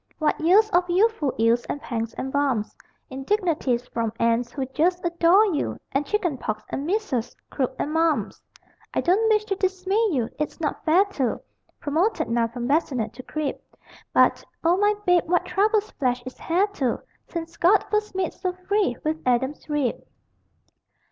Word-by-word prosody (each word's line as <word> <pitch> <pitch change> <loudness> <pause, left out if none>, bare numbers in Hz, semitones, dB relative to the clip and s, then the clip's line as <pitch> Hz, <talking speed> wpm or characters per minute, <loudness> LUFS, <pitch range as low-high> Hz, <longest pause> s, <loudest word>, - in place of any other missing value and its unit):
What 310 -1 0
years 385 +7 +5
of 355 0 +2
youthful 370 - +2
ills 230 +2 +3
and - - -4
pangs 230 -4 -4
and 265 - -5
bumps 270 -7 0 0.4
Indignities 270 - 0
from 230 -2 -2
aunts 235 +1 +1
who 270 -3 -3
"just 345 +7 0
adore" 345 +4 +4
you, 295 - -2
And 280 +2 -1
chicken 350 -10 -1
pox 215 -1 -3
and 280 +3 -3
measles, 330 - -1 0.2
croup 260 -1 -1
and 300 - -2
mumps! 325 -1 +1 0.5
I - - +2
don't 410 +6 +3
wish 425 -1 +3
to 400 -2 -1
dismay 380 +3 +1
you, 255 - 0
it's 300 - -3
not 310 -3 -3
fair 345 +5 +5
to, 280 - -2 0.4
Promoted 340 +9 0
now 230 0 +2
from 240 +1 -5
bassinet 275 -5 0
to 245 - -9
crib, 300 +2 -3 0.5
But, - - +3 0.2
O 335 +2 +4
my 415 +1 +3
babe, 360 -2 +4
what 355 - +2
troubles 425 +1 +1
flesh 250 -2 -1
is 255 - -9
heir 360 +4 +4
to 300 - -2 0.2
Since 335 0 -6
God 360 +5 +4
first 425 -2 -1
made 370 -3 -1
so 365 -1 -3
free 370 - 0
with 315 +1 -1
Adam's 260 +5 0
rib! 290 -5 0
315 Hz, 170 wpm, -24 LUFS, 255-380 Hz, 0.5 s, years